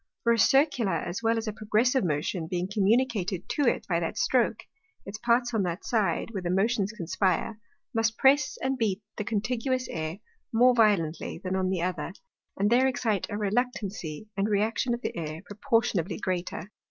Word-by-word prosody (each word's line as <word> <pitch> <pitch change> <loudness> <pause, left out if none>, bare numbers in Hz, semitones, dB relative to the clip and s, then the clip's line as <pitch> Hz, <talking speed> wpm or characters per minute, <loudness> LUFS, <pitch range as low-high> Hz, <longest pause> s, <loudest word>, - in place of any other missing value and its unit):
For 235 - +4
a 230 - 0
Circular 260 - +3
as 175 +4 -3
well 230 0 +2
as 225 0 -3
a 215 - -2
Progressive 230 +5 +1
Motion 160 +1 -1
being 180 +1 -2
communicated 205 -2 +1
to 290 -4 +1
it - - +1
by 170 -3 +1
that 165 - -3
stroak, 260 -7 +1 0.4
its 205 +2 -7
parts 240 +1 +2
on 220 - +2
that 175 -1 -3
side, 215 -6 0
where 195 -4 -4
the 175 - -3
Motions 200 +2 +1
conspire, 195 +2 -1 0.3
must 225 -1 +1
press 270 +1 +4
and 265 0 0
beat 210 -2 0
the 210 - -2
contiguous 250 +4 -1
Air 160 +1 -4 0.3
more 245 +2 +5
violently 205 -9 +2
than 185 +2 -3
on 185 -1 0
the 185 -3 -1
other, 175 -2 -3 0.4
and 205 +3 +1
there 255 +2 +5
excite 235 -6 0
a 205 - -3
Reluctancy 210 -5 -2
and 200 +2 0
Reaction 220 +4 +1
of 240 - -11
the - - -3
Air 160 +1 -5
proportionably 205 -4 0
greater. 185 0 -3
210 Hz, 175 wpm, -27 LUFS, 185-235 Hz, 0.4 s, more